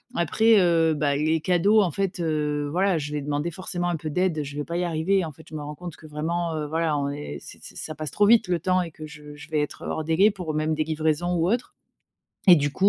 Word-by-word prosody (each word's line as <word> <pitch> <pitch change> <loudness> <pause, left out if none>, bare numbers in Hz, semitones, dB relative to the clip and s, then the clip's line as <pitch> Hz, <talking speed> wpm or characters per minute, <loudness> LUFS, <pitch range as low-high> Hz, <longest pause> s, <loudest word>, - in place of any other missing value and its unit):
Après, 220 +6 +4
heu, 165 -3 +3
bah, 145 -1 +1
les 155 +2 +1
cadeaux 185 +6 +4
en 185 - +2
fait, 195 +2 -2
heu, 150 -3 -1
voilà 185 +1 +2
je 145 0 -5
vais 150 -1 -2
demander 145 +3 -2
forcément 175 0 -3
un 175 - 0
peu 155 0 -5
d'aide, 180 0 +1
heu, 150 - -1
je 145 0 -8
vais 145 - -2
pas 170 +3 -4
y 180 - 0
arriver 175 +3 +1
en 155 - -6
fait. 160 +3 -17
Je - - -9
me 150 - -4
rends 150 +1 -6
compte 175 +1 -8
que - - -16
vraiment, 160 +2 -2
heu, 150 -1 -3
voilà, 160 -1 0
on 140 0 -1
est 145 - -6
ç - - -12
ç - - -11
ça 155 - -6
passe 155 -1 -5
trop 205 -1 +3
vite 225 -2 +5
le 175 -2 +1
temps 185 +2 +1
et 170 - -7
que 155 0 -9
je 150 -1 -11
je 150 +2 -12
vais 155 -2 0
être, 150 - -5
heu, - - -5
hors 160 - -2
délai 165 +7 +4
pour 180 -7 -5
même 155 +1 0
des 155 - 0
livraisons 160 +2 0
ou 170 +1 +1
autres 240 +1 -2 0.7
et 180 -3 +9
du 145 0 +1
coup, 195 +7 +3
160 Hz, 280 wpm, -25 LUFS, 150-180 Hz, 0.7 s, et